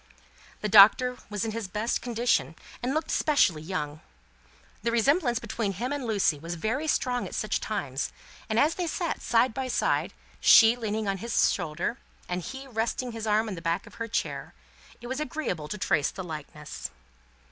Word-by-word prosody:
The 210 - 0
Doctor 220 +5 +7
was 210 0 -2
in 220 - -2
his 225 -2 -4
best 210 +5 -1
condition, 230 - 0 0.3
and 245 +2 -1
looked 315 0 -1
specially 195 - +3
young. 155 -3 -4 0.8
The 235 - 0
resemblance 240 +2 +2
between 210 -4 -2
him 245 +9 -3
and 285 -3 -3
Lucie 200 -9 +1
was 165 +3 -5
very 230 - -2
strong 250 -4 0
at - - -7
such 215 0 0
times, 140 -11 -3 0.4
and 220 - 0
as 300 +7 +4
they 355 -2 -3
sat 335 +1 -2
side 235 +1 +2
by 265 +2 -3
side, 250 - 0 0.3
she 225 0 +8
leaning 220 -2 -2
on 195 -1 -1
his 230 +2 +2
shoulder, 175 +7 -3 0.3
and 180 0 -2
he 265 +9 -7
resting 240 0 -2
his 225 -1 -5
arm 215 +1 +2
on 210 - -4
the 170 - -7
back 165 0 -1
of 235 - -13
her 230 - -1
chair, 230 - -3 0.5
it - - -10
was 260 +3 -3
very 305 - -2
agreeable 180 - -3
to 210 - -5
trace 150 -7 +1
the 190 - -7
likeness. 150 -2 -7
220 Hz, 185 wpm, -27 LUFS, 180-245 Hz, 0.8 s, she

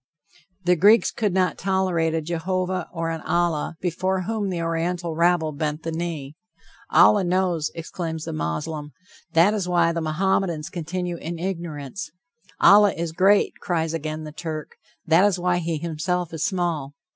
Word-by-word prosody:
The 180 0 +4
Greeks 205 +7 +5
could 210 -3 -1
not 185 0 +1
tolerate 180 -4 +1
a 160 - 0
Jehovah, 180 +2 -2
or 165 -1 -2
an 165 -1 -4
Allah, 170 -2 0
before 185 +1 -1
whom 215 0 -2
the 180 -2 -2
Oriental 165 +1 -2
rabble 170 -1 +2
bent 150 +1 -3
the 165 - -3
knee. 160 -4 -4 0.6
"Allah 205 -2 +6
knows," 175 -3 +1
exclaims 165 -1 -5
the - - -4
Moslem; 130 - -4 0.4
that 170 +6 +5
is 195 -4 -2
why 170 -1 +3
the 170 0 -2
Mohammedans 165 0 0
continue 175 +1 -3
in 170 +1 -5
ignorance. 170 -1 -5 0.5
"Allah 205 0 +7
is 170 -1 -3
great," 195 +4 +3
cries 165 -3 -1
again 155 -1 -4
the 155 - -7
Turk. 155 -1 -6 0.3
That 165 +3 +5
is 205 -2 +3
why 180 0 +1
he 165 -1 -2
himself 170 +2 -2
is 160 - -2
small. 165 -7 -1
170 Hz, 155 wpm, -24 LUFS, 160-185 Hz, 0.6 s, Allah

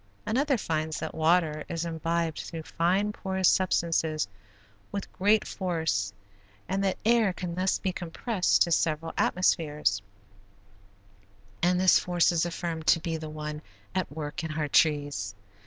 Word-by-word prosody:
Another 270 +4 +1
finds 155 -5 -2
that - - -4
water 160 -1 +2
is 165 0 -2
imbibed 165 -1 -1
through 165 -1 -6
fine 185 +6 +1
porous 190 -2 0
substances 165 - +2 0.6
with 200 -1 -5
great 210 +3 +3
force 160 - -1 0.6
and 195 +1 -1
that 190 -1 0
air 225 -3 +4
can 180 -2 -5
thus 185 +2 +1
be 190 - -2
compressed 180 +4 +1
to 170 - -3
several 165 0 +1
atmospheres, 150 - +1 1.6
and 180 +1 +3
this 185 0 +6
force 175 -1 +2
is 170 0 +1
affirmed 165 -2 -4
to 165 - +6
be 165 0 -3
the 155 -1 -5
one 150 0 -5 0.3
at 185 -4 -1
work 150 +2 -5
in 160 -1 -3
our 150 -1 0
trees. 145 -10 +1
165 Hz, 140 wpm, -28 LUFS, 155-185 Hz, 1.6 s, this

